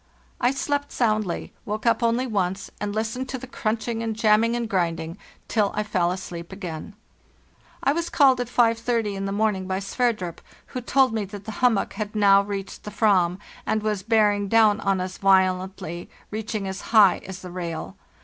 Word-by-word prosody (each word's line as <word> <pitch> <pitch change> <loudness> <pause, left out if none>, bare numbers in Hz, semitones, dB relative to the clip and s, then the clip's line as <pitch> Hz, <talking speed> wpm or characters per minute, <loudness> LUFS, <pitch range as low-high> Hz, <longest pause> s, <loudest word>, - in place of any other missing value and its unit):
"T 245 - +5
slept 285 +1 -2
soundly, 215 -6 -1
woke 215 +2 -4
up 230 0 +3
only 235 +2 +2
once, 195 -4 -2
and 205 0 -2
listened 225 +4 -2
to 260 - -3
the 260 - -8
crunching 230 -1 -2
and 225 -1 -2
jamming 225 +1 +3
and 240 -1 -2
grinding 165 -5 -1 0.3
till 210 -3 +1
I 210 - 0
fell 185 -5 +1
asleep 170 -2 -6
again. 185 0 -7 0.9
I 275 - +3
was 335 +1 -2
called 265 -4 +4
at 245 - -3
5.30 230 -2 +1
in 195 0 -4
the 195 - -2
morning 200 -2 0
by 190 0 -1
Sverdrup, 195 -3 -1 0.3
who 255 - -5
told 260 0 +3
me 220 -2 -1
that 200 0 -10
the 220 - -5
hummock 240 -5 +2
had 210 0 -5
now 200 -2 +6
reached 200 -1 -6
the - - -6
fram, 190 -5 +2 0.3
and 215 -1 -1
was 210 -3 -1
bearing 205 -1 +2
down 215 0 +4
on 195 -1 +1
us 185 0 -5
violently, 185 -2 +1 0.2
reaching 215 -1 -3
as 190 0 -5
high 210 -4 +5
as 190 -1 -8
the 180 - -7
rail. 170 -3 -5
210 Hz, 180 wpm, -24 LUFS, 190-230 Hz, 0.9 s, now